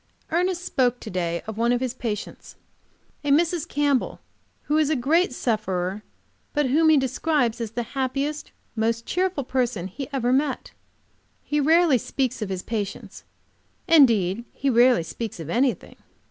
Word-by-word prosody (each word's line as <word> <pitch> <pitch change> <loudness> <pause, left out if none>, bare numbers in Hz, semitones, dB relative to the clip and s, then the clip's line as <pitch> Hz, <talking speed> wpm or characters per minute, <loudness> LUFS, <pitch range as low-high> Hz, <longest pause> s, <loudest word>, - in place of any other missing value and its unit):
Ernest 360 +1 0
spoke 250 -2 +1
to 220 - -8
day 170 -2 -2
of 220 0 -6
one 235 +1 +2
of 245 - +2
his 255 -1 -2
patients, 225 -5 -6 0.7
a 290 - -2
Mrs. 330 +2 +2
Campbell, 285 -4 0 0.4
who 300 +1 +1
is 305 -2 +2
a 310 - +2
great 305 +8 +2
sufferer, 200 -5 -2 0.5
but 295 -1 +1
whom 315 +3 +4
he 310 - +6
describes 265 -3 0
as 225 -1 -4
the 240 - -2
happiest, 275 +3 -2 0.3
most 230 +1 0
cheerful 365 -5 -1
person 245 -7 -1
he 250 +9 -6
ever 250 -2 0
met. 275 0 0 0.7
He 295 - -1
rarely 320 -2 +4
speaks 260 +1 -2
of 210 - -3
his 185 -1 -4
patients. 210 -4 -5 0.6
Indeed, 230 - +4
he 275 0 0
rarely 240 -5 +5
speaks 215 +5 -6
of 165 0 -6
anything. 250 +4 0
255 Hz, 155 wpm, -24 LUFS, 225-295 Hz, 0.7 s, he